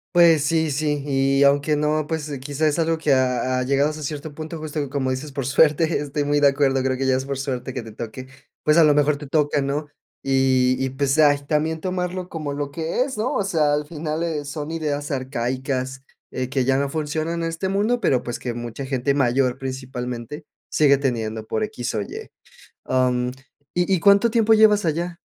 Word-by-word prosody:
Pues 165 -4 +6
sí, 160 0 +1
sí. 145 0 -1
Y 135 0 +2
aunque 140 +2 +3
no, 150 0 0
pues 155 -2 -3
quizá 145 +3 -1
es 150 +2 0
algo 165 0 +1
que 155 -3 +2
ha 130 0 +1
ha, - - 0
llegado 140 +3 +2
hasta 155 0 -8
cierto 150 +1 -5
punto 160 +2 -6
justo, 150 -2 -4
como 130 -1 -1
dices, 135 +3 -4
por 135 -2 -4
suerte 155 +4 +3
estoy 145 0 -2
muy 145 0 +1
de 145 - +6
acuerdo, 135 -1 +2
creo 130 0 0
que 135 - -1
ya 130 -1 +3
es 130 - -4
por 140 0 -3
suerte 130 -1 -4
que 125 - -4
te 110 - -10
toque, 115 +4 -7 0.4
pues 150 +1 +3
a 165 - +7
lo 150 -1 +5
mejor 145 0 +2
te 145 0 -9
toca, 145 0 +1
¿no? 140 +2 -2 0.4
Y 130 -1 +3
y 130 - 0
pues 135 +1 0
ay 145 -2 +4
también 160 +1 0
tomarlo 180 0 -3
como 155 -3 -4
lo 145 0 -4
que 160 - -2
es, 265 -2 -6
¿no? 220 +4 -1
O - - +1
sea, 155 -6 +1
al 150 0 0
final 155 +1 -4
eh, 155 -4 -2
son 150 +2 -5
ideas 150 -3 -3
arcaicas, 130 0 -3 0.3
eh, 130 -1 -3
que 130 -1 0
ya 135 +1 +2
no 140 0 0
funcionan 155 +3 -2
este 165 +3 -2
mundo, 210 +5 +1
pero 130 - +2
pues 120 - -5
que 120 - -4
mucha 120 +3 -6
gente 130 0 0
mayor 130 -2 +1
principalmente 130 +1 -6 0.2
sigue 140 -2 +4
teniendo 115 -5 -2
por 165 - -2
equis 170 - -4
o 105 - 0
ye. 100 - -8 0.5
Am, 125 -1 +1 0.4
¿y 175 +2 +1
y 185 - +2
cuánto 200 +5 +5
tiempo 225 -1 +3
llevas 215 -2 +5
allá? 170 +2 -2
145 Hz, 210 wpm, -22 LUFS, 130-160 Hz, 0.5 s, a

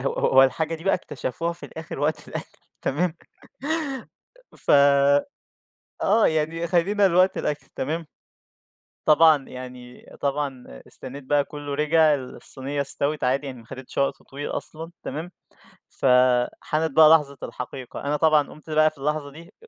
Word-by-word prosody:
ه - - -8 0.2
هو 135 0 +6
الحاجة 155 +5 +1
دي 165 +1 -10
بقى 195 - +3
اكتشفوها 170 -1 -4
في 170 - -10
الآخر 160 -3 -8
وقت 150 +2 -1
الأكل، - - -7 0.2
تمام؟ 160 +4 0 1.4
ف - - -3 1.3
آه، 215 +3 +4
يعني 160 +2 0
خلّينا 195 +4 +3
لوقت 185 +2 +3
الأكل، 150 0 -3
تمام؟ 160 +4 -3 1.0
طبعًا 155 -2 +6
يعني 125 -1 -10
طبعًا 140 -2 -2 0.2
استنيت 135 +2 -9
بقى 145 +1 +2
كله 145 -1 -6
رِجع، 150 +1 +4
الصينية 135 +1 -5
استوِت، 140 +1 -1
عادي 135 +3 +1
يعني، 130 -2 -7
ما 115 - -18
حدِتش 130 +1 -9
وقت 140 0 0
طويل 140 +2 -7
أصلًا، 160 +2 -6
تمام؟ 160 +4 -5 0.6
فحانت 130 +5 +2
بقى 155 +2 +7
لحظة 140 -3 -1
الحقيقة، 125 0 -7
أنا 145 +1 0
طبعًا 155 -2 +3
قُمت 155 +1 -14
بقى 155 0 +4
في 155 - -22
اللحظة 145 +1 -2
دي، 170 +7 -14
150 Hz, 140 wpm, -24 LUFS, 135-160 Hz, 1.4 s, بقى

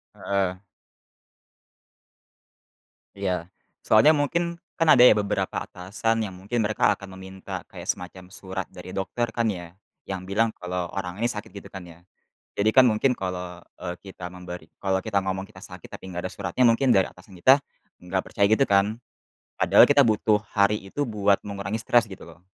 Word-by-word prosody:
Heeh. 95 -1 -2 2.5
Iya. 90 -4 -2 0.4
Soalnya 110 +7 +6
mungkin, 170 +3 +1 0.2
kan 165 - 0
ada 130 -5 +8
ya - - +9
beberapa 100 -2 -1
atasan 110 +5 -2
yang 95 - -7
mungkin 105 +5 -2
mereka 105 -1 +2
akan 100 -1 -11
meminta 95 0 -8
kayak - - -10
semacam 90 +1 -4
surat 95 -1 -5
dari 90 0 -10
dokter 105 +6 -2
kan 115 +1 -1
ya? 85 0 -10 0.3
Yang 95 -2 -3
bilang 105 +4 +1
kalau 90 -1 -4
orang 95 +1 -4
ini 120 - +2
sakit 105 -3 -7
gitu 100 - -10
kan 95 -2 -9
ya? 85 0 -14 0.5
Jadi 105 +2 +2
kan 130 +3 +6
mungkin 120 +3 +2
kalau, 90 -1 -5 0.2
eee, 90 -1 -5
kita 95 -2 -8
memberi 90 -2 -9
kalau 95 -1 0
kita 110 -3 0
ngomong 95 0 -2
kita - - -15
sakit 90 -3 -11
tapi - - -10
nggak 90 0 -4
ada - - -13
suratnya 130 - -1
mungkin 125 +2 +3
dari 95 - +3
atasan 90 +2 -17
kita, 130 +8 +7 0.5
nggak 95 +1 -1
percaya 100 - +2
gitu 110 +6 +3
kan? 100 +3 +2 0.6
Padahal - - +7
kita 140 - +5
butuh 110 -3 +2 0.2
hari 105 +1 +3
itu 95 +10 -3
buat 100 -3 +2
mengurangi 100 +1 -4
stres 115 0 +2
gitu 95 - -10
loh. 85 +2 -16
100 Hz, 170 wpm, -25 LUFS, 90-110 Hz, 2.5 s, ya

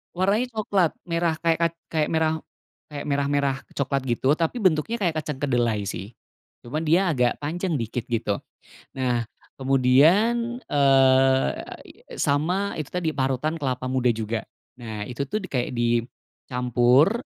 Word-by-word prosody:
warnanya 200 +7 +1
coklat, 200 -6 +1
merah, 170 -2 0
kaya 165 -1 +3
kac 170 0 +1 0.2
kayak 155 -2 +1
merah 160 0 +1 0.5
kayak 145 -1 -6
merah, 140 -1 0
merah 140 -1 +1 0.2
coklat 135 -1 -1
gitu 125 +3 +1
tapi 165 +9 0
bentuknya 185 +5 +2
kayak 170 -8 0
kacang 150 -2 -4
kedelai 120 -6 +1
sih, 100 +3 -6 0.5
cuma 130 +6 -3
dia 165 +3 +2
agak 125 -4 +1
panjang 170 +3 -2
sedikit 115 -2 -3
gitu. 110 -4 -1 0.5
Nah, 125 -3 0 0.3
kemudian, 170 - +3
e 145 - 0 0.9
a - - -10
i - - -17
sama 175 +8 0
itu 155 -3 -6
tadi 180 -3 0
parutan 135 +3 -1
kelapa 130 -3 -2
muda 125 -2 +2
juga. 110 0 -3 0.3
Nah, 110 -4 -6
itu 140 +3 -3
tuh 215 +10 -3
kayak 130 -9 -3
dicampur, 125 - +1
145 Hz, 140 wpm, -24 LUFS, 125-170 Hz, 0.9 s, kaya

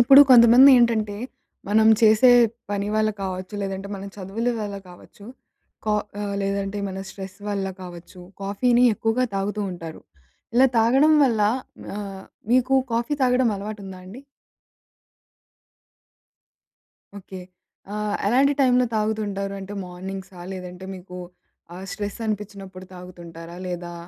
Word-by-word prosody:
ఇప్పుడు 270 +4 +8
కొంతమంది 245 +2 +8
ఏంటంటే 220 -4 +1 0.5
మనం 220 +1 +4
చేసే 220 +3 +6 0.4
పని 200 0 -2
వళ్ళ 215 0 +2
కావచ్చు, 185 +1 -5
లేదంటే 195 0 -5
మన 195 0 -7
చదువుల 205 +5 -3
వల్ల 205 -1 -4
కావచ్చు, 180 +3 -16 0.6
కా 215 -1 +1 0.5
లేదంటే 195 +1 -2
మన 190 0 -6
స్ట్రెస్ 195 0 -9
వల్ల 200 -1 -2 0.2
కావచ్చు, 175 0 -11 0.2
కాఫీని 240 +5 +2
ఎక్కువగా 225 +4 0
తాగుతూ 205 +2 -2
ఉంటారు. 165 -2 -9 0.5
ఇలా 255 +2 +6
తాగడం 265 +7 +4
వల్ల 230 -5 +1 0.6
ఆహ్, 195 -2 -7 0.3
మీకు 255 +1 +3 0.2
కాఫీ 235 +5 0
తాగడం 250 -1 +3
అలవాటు 210 +1 -7
ఉందా 190 -1 -9
అండి? 200 +8 -11 3.0
ఓకే. 190 -1 -10 0.6
ఆహ్, 210 0 -2
ఎలాంటి 270 +6 +3
టైంలో 250 -2 +4
తాగుతుంటారు? 210 -2 -2
అంటే 195 +1 -8
మార్నింగ్సా 190 +1 -8
లేదంటే 180 0 -8
మీకు 180 0 -10 0.6
ఆహ్, 185 +2 -8
స్ట్రెస్ 205 +1 -5
అనిపిచ్చినప్పుడు 195 -3 -6
తాగుతుంటారా? 170 -2 -11
లేదా 175 -1 -6
200 Hz, 115 wpm, -23 LUFS, 190-225 Hz, 3.0 s, ఇప్పుడు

